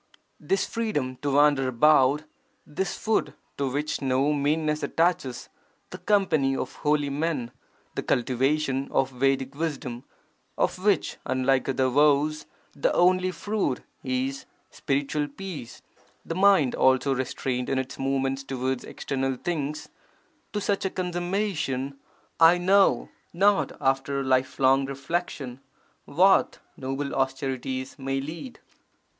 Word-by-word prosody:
This 195 +6 0
freedom 170 - -2
to 140 +2 -2
wander 145 -2 +4
about, 140 +2 +4 0.4
this 170 +6 -3
food 220 0 0 0.2
to 140 -1 0
which 145 +3 -2
no 135 +2 +2
meanness 150 +1 0
attaches, 165 -8 0 0.4
the 185 - -7
company 165 -9 +2
of 130 - -5
holy 145 -1 +1
men, 145 -5 -2 0.4
the - - -2
cultivation 135 +2 0
of 135 0 +1
Vedic 135 +1 0
wisdom, 140 -5 -4 0.5
of 185 - 0
which 200 -6 +1
(unlike 130 +1 +1
other 130 0 +1
vows) 150 +3 +2 0.3
the 140 - +1
only 185 +1 +4
fruit 195 -8 -2 0.2
is 130 +1 -2 0.3
spiritual 145 +2 -1
peace, 145 -5 -8 0.4
the - - -3
mind 185 -7 +4
also 130 +1 +3
restrained 125 -1 -2
in 135 - 0
its 130 +1 -4
movements 135 0 0
towards 130 -1 -2
external 135 -1 -3
things 150 0 -3 0.3
— - - -40
to 210 - -2
such 200 0 -1
a 190 - 0
consummation, 175 -7 -2 0.4
I 165 +2 +7
know 195 +2 +3 0.2
not 200 +3 +3
after 135 +1 0
lifelong 130 +1 +2
reflection, 140 -2 -4 0.5
what 185 +7 +3 0.2
noble 135 +2 -4
austerities 135 0 -2
may 135 0 -2
lead! 165 - -7
140 Hz, 120 wpm, -26 LUFS, 135-165 Hz, 0.5 s, I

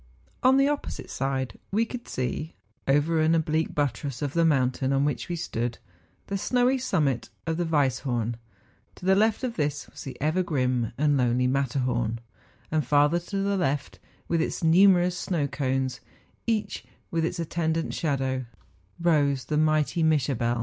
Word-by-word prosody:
On 260 +1 +5
the 275 - +5
oppo¬ 290 0 -1
site - - -8
side 135 -1 -2
we 220 +4 +1
could 240 +1 -7
see, 130 +5 -3 0.3
over 150 +4 +3
an 160 +1 +4
oblique 160 0 0
buttress 140 -1 -2
of 145 -1 -2
the 170 - +3
mountain 130 -3 +2
on 135 +1 +2
which 145 - -2
we 175 - -1
stood, 120 -7 -3 0.5
the 195 0 -3
snowy 250 +4 +2
summit 150 - 0 0.2
of 165 -1 -1
the 175 - 0
Weisshorn; 130 -6 0 0.6
to 180 - -11
the 190 - +5
left 220 +4 +2
of 245 -2 -3
this 145 -2 -1
was - - -10
the 135 - -8
ever 155 +6 +1
grim 125 -8 0
and 145 0 +3
lonely 125 0 +2
Matterhorn; 125 -3 0 0.5
and 155 -1 +1
farther 145 +5 +3
to 195 +3 -3
the 200 0 +1
left, 145 -5 -1 0.3
with 165 -1 +1
its 165 - -2
numerous 180 +1 +5
snow 175 -4 -1
cones, 130 -2 -1 0.5
each 220 -2 -1 0.3
with 165 -1 0
its 170 +2 -1
at¬ 165 -2 -3
tendant 165 -1 -1
sliadow, 130 -4 -1 0.5
rose 145 -6 +2
the 150 - -2
mighty 155 +1 +2
]\Iischabel. 130 -6 +1
150 Hz, 165 wpm, -26 LUFS, 130-175 Hz, 0.6 s, On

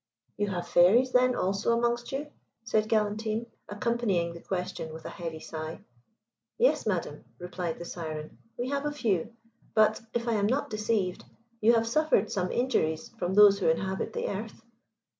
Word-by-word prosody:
"You 205 - -1
have 175 -3 -3
fairies, 205 +10 +5
then, 250 0 +4
also 200 +5 +1
amongst 240 0 0
you?" 290 +2 -4 0.3
said 215 -1 +1
Galantine, 215 +1 0 0.2
accompanying 205 -5 0
the 170 - -10
question 180 -3 -4
with 160 0 -10
a - - -5
heavy 165 -2 -6
sigh. 155 0 -6 0.8
"Yes, 485 - +3
madam," 170 -7 -2
replied 180 0 -4
the 170 - -7
Syren, 155 -3 -6 0.2
"we 245 +1 -2
have 280 +1 -1
a - - -1
few; 230 - -1 0.4
but, 215 0 +4
if 235 0 -1
I 235 - +2
am 205 -2 +2
not 260 +2 0
deceived, 215 -4 -1 0.4
you 230 +2 +5
have 230 -1 +3
suffered 305 -3 +2
some 185 -2 -1
injuries 160 -11 0
from 180 +2 -1
those 205 -1 +8
who 185 - +2
inhabit 190 +4 -1
the - - -2
earth? 215 +3 -5
210 Hz, 165 wpm, -29 LUFS, 175-235 Hz, 0.8 s, those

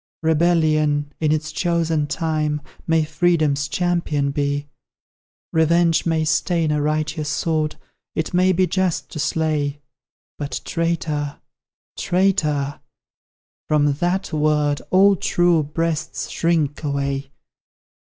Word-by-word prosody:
Rebellion, 155 -3 +2
in 155 -2 +1
its 155 0 -1
chosen 165 -3 0
time, 150 -1 -1 0.3
May 160 -1 +3
Freedom's 155 -4 +1
champion 170 -5 0
be; 145 0 -1 0.9
Revenge 165 +1 +3
may 160 -1 +1
stain 165 0 +1
a 150 -1 +1
righteous 155 0 -1
sword, 155 0 -1 0.4
It 160 - -2
may 185 +1 +4
be 185 +1 +3
just 185 -2 -1
to - - -6
slay; 150 -2 0 0.6
But, 145 -1 -3
traitor, 160 -4 -2 0.6
traitor, 150 -7 0 0.9
from 145 -2 +3
THAT 175 +6 -1
word 150 -1 +1
All 195 +2 +5
true 175 -2 +2
breasts 160 +1 -3
shrink 160 -3 0
away! 140 -1 -2
155 Hz, 105 wpm, -21 LUFS, 145-170 Hz, 0.9 s, All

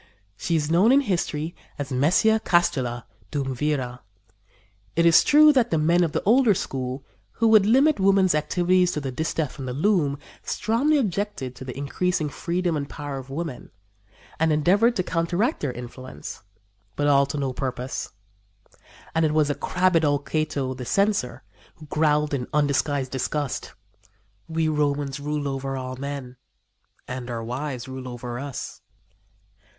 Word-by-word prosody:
She 170 - -1
is 155 -1 0
known 190 +8 +5
in 275 +2 +6
history 170 - -2 0.2
as 140 -2 -5
Messia 175 +12 +3
Castula, 130 -9 +1 0.3
duumvira. 135 -2 -2 1.0
It 170 - +3
is 165 -1 +7
true 300 0 +7
that 245 -4 +3
the 160 - +1
men 170 +3 +3
of 165 - 0
the - - -2
older 230 -1 +4
school, 130 -2 -4 0.3
who 230 - +1
would 215 -2 +6
limit 270 +4 +4
woman's 195 -1 +4
activities 180 +4 +2
to - - -2
the 135 -2 -4
distaff 155 +1 -2
and 130 - -5
the 125 - -3
loom, 150 -2 +1 0.2
strongly 270 +8 +1
objected 200 - -2
to 130 - -9
the 130 0 -7
increasing 155 +3 -1
freedom 175 +3 -1
and 140 -2 -3
power 145 -2 -5
of 130 0 -11
women, 150 -2 -5 0.7
and 160 0 +3
endeavored 195 +10 +3
to 185 - 0
counteract 180 - 0
their 140 - -2
influence; 125 - -9 0.5
but 145 - 0
all 140 -1 +4
to 145 +2 -4
no 135 -2 -1
purpose. 130 -1 -4 1.0
And 160 - +2
it 155 -1 +1
was 150 -2 +3
the - - +2
crabbed 180 +1 +1
old 145 -1 +1
Cato, 155 -4 -1
the 130 -1 -7
Censor, 195 - 0 0.3
who 155 - -13
growled 150 0 +1
in 125 -3 -2
undisguised 145 -2 +1
disgust: 135 +2 -3 0.7
"We 160 -1 0
Romans 145 -2 0
rule 145 0 -2
over 135 0 -3
all 130 0 -5
men 135 -2 -6 0.7
and 125 -1 -5
our 115 -1 -4
wives 125 +1 -4
rule 130 -1 -7
over 120 0 -6
us." 140 -2 -6
150 Hz, 155 wpm, -24 LUFS, 135-175 Hz, 1.0 s, is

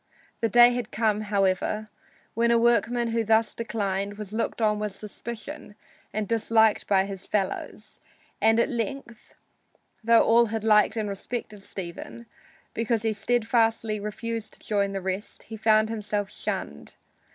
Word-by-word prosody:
The 230 - +1
day 240 +3 +7
had 240 -3 -3
come, 215 -1 0
however, 205 +1 0 0.5
when 235 +1 +2
a 235 - +5
workman 235 0 +2
who 230 0 0
thus 220 0 +2
declined 205 -3 -3
was 210 -1 -7
looked 230 +2 -2
on 210 -2 +2
with 210 -2 -3
suspicion 230 +4 -8 0.4
and 215 -1 -2
dislike 220 0 +2
by 195 -1 +3
his 195 -1 -7
fellows, 210 +1 -3 0.4
and 225 +2 +4
at - - +2
length 240 -1 -5 0.7
though 230 +1 +6
all 235 +1 +5
had 220 0 -3
liked 215 0 +4
and 215 -1 -1
respected 210 +1 -5
Stephen 195 +5 -8 0.5
because 230 -1 0
he 220 -1 +1
steadfastly 225 -1 +1
refused 220 +1 -5
to - - -13
join 200 -2 +1
the 195 - -3
rest, 190 +2 -4
he 225 - -9
found 220 0 +3
himself 210 -2 -3
shunned. 75 0 -5
220 Hz, 150 wpm, -26 LUFS, 205-230 Hz, 0.7 s, day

